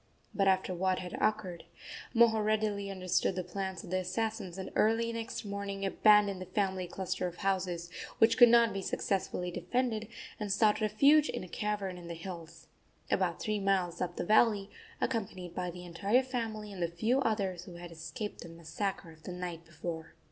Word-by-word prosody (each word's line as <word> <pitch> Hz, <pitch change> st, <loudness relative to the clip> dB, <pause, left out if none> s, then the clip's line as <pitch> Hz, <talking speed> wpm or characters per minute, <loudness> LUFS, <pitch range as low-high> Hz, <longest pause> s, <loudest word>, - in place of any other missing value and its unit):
But, 195 Hz, -1 st, +2 dB
after 190 Hz, -1 st, +2 dB
what 185 Hz, +1 st, +1 dB
had 180 Hz, -1 st, -6 dB
occurred, 190 Hz, -5 st, 0 dB, 0.5 s
Moho 225 Hz, -2 st, +5 dB
readily 210 Hz, -2 st, 0 dB
understood 185 Hz, -1 st, 0 dB
the 185 Hz, -, -2 dB
plans 190 Hz, 0 st, -4 dB
of -, -, -10 dB
the 185 Hz, -, +2 dB
assassins, 195 Hz, 0 st, -3 dB
and 190 Hz, -, -5 dB
early 230 Hz, +2 st, +2 dB
next 230 Hz, 0 st, -4 dB
morning 200 Hz, -1 st, -3 dB
abandoned 205 Hz, -1 st, +4 dB
the 185 Hz, -, -6 dB
family 190 Hz, -3 st, -1 dB
cluster 185 Hz, 0 st, -2 dB
of 175 Hz, -, -7 dB
houses, 180 Hz, -3 st, -1 dB, 0.3 s
which 225 Hz, +1 st, +5 dB
could 240 Hz, -1 st, +9 dB
not 235 Hz, -2 st, +5 dB
be 195 Hz, -, -3 dB
successfully 180 Hz, -2 st, -1 dB
defended, 220 Hz, +5 st, -1 dB, 0.3 s
and 210 Hz, -2 st, -2 dB
sought 210 Hz, +2 st, +3 dB
refuge 280 Hz, +8 st, +5 dB
in -, -, -3 dB
a -, -, -8 dB
cavern 200 Hz, -1 st, -3 dB
in 170 Hz, -, -10 dB
the 170 Hz, -, -5 dB
hills, 170 Hz, -1 st, -8 dB, 0.5 s
about -, -, +1 dB
three 215 Hz, -2 st, -1 dB
miles 195 Hz, -3 st, +1 dB
up 180 Hz, -, -2 dB
the -, -, -3 dB
valley, 215 Hz, -1 st, +4 dB, 0.3 s
accompanied 190 Hz, -7 st, -2 dB
by 180 Hz, 0 st, -2 dB
the 180 Hz, +1 st, -8 dB
entire 200 Hz, +9 st, +2 dB
family 225 Hz, -5 st, -4 dB
and 185 Hz, -, -7 dB
the 170 Hz, -, +2 dB
few 220 Hz, +10 st, +1 dB
others 195 Hz, -7 st, -1 dB
who 175 Hz, -, -10 dB
had 175 Hz, 0 st, -9 dB
escaped 165 Hz, +6 st, -6 dB
the 170 Hz, -, -8 dB
massacre 170 Hz, +2 st, -4 dB
of 160 Hz, -1 st, -17 dB
the 180 Hz, -, -7 dB
night 175 Hz, -2 st, -5 dB
before. 165 Hz, 0 st, -6 dB
195 Hz, 185 wpm, -32 LUFS, 180-215 Hz, 0.5 s, could